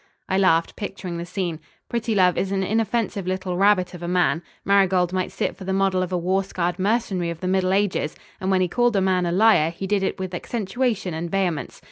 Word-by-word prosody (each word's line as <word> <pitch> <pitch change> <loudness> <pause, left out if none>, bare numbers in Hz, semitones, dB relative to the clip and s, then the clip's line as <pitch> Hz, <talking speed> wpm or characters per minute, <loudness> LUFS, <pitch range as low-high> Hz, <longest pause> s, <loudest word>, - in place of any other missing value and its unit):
I 190 - +1
laughed, 165 -4 +3
picturing 190 -4 -5
the 170 - -5
scene. 175 -3 -3 0.3
Prettilove 215 -6 +2
is 195 - -1
an 195 -1 0
inoffensive 220 -1 -1
little 185 -1 -2
rabbit 190 -1 +3
of 175 - -9
a 170 - -4
man. 175 -2 +2 0.2
Marigold 190 -2 +3
might 185 -1 -1
sit 190 - -2
for - - -10
the 190 +1 -2
model 195 -1 +2
of 185 0 -3
a 180 - +1
war 185 +3 +1
scarred 180 -1 -2
mercenary 195 -4 0
of 170 -1 -5
the 185 - -3
middle 185 0 +1
ages, 195 -6 0 0.2
and 190 - -2
when 190 -1 +3
he 180 - +2
called 240 +4 +1
a - - +4
man 185 -2 +2
a - - 0
liar 190 -4 +4
he 170 +3 -6
did 200 0 +1
it 190 - -1
with 185 -1 -5
accentuaton 210 0 -2
and 165 +2 -4
vehemence. 180 -5 -2
185 Hz, 220 wpm, -23 LUFS, 180-195 Hz, 0.3 s, a